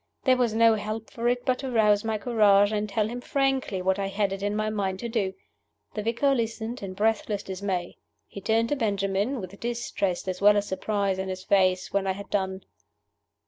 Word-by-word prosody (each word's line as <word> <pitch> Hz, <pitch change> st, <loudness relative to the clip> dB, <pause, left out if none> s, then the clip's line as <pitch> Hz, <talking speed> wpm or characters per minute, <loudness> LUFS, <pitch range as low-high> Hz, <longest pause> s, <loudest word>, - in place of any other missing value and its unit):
There 260 Hz, -2 st, +5 dB
was 240 Hz, -3 st, +1 dB
no 230 Hz, 0 st, +6 dB
help 215 Hz, +1 st, -4 dB
for 235 Hz, 0 st, -2 dB
it 245 Hz, 0 st, 0 dB
but 255 Hz, -1 st, +1 dB
to 265 Hz, -, -4 dB
rouse 210 Hz, -3 st, +3 dB
my 220 Hz, -1 st, -1 dB
courage, 205 Hz, -3 st, +4 dB
and 210 Hz, 0 st, -1 dB
tell 210 Hz, +1 st, 0 dB
him 245 Hz, +2 st, -5 dB
frankly 265 Hz, -9 st, 0 dB
what 190 Hz, +1 st, +1 dB
I 195 Hz, -, -1 dB
had 195 Hz, 0 st, 0 dB
it 195 Hz, -, -6 dB
in 205 Hz, +1 st, -1 dB
my 215 Hz, 0 st, -1 dB
mind 195 Hz, -3 st, -1 dB
to 235 Hz, -, -3 dB
do. 200 Hz, -5 st, -1 dB, 0.6 s
The 210 Hz, -, -3 dB
vicar 235 Hz, +6 st, +1 dB
listened 230 Hz, -1 st, -3 dB
in 190 Hz, -2 st, -6 dB
breathless 210 Hz, -1 st, 0 dB
dismay. 190 Hz, -2 st, -3 dB, 0.3 s
He 200 Hz, -, -10 dB
turned 225 Hz, +3 st, +1 dB
to 290 Hz, -, +1 dB
Benjamin, 205 Hz, +1 st, 0 dB
with 195 Hz, 0 st, -8 dB
distress 230 Hz, -6 st, -2 dB
as 185 Hz, 0 st, -3 dB
well 205 Hz, +1 st, +6 dB
as 205 Hz, 0 st, 0 dB
surprise 195 Hz, 0 st, -1 dB
in 190 Hz, 0 st, -3 dB
his 185 Hz, 0 st, -5 dB
face, 185 Hz, -2 st, +2 dB
when 200 Hz, -1 st, +1 dB
I 190 Hz, -, +1 dB
had 200 Hz, +1 st, -10 dB
done. 190 Hz, -1 st, -1 dB
210 Hz, 210 wpm, -26 LUFS, 195-230 Hz, 0.6 s, no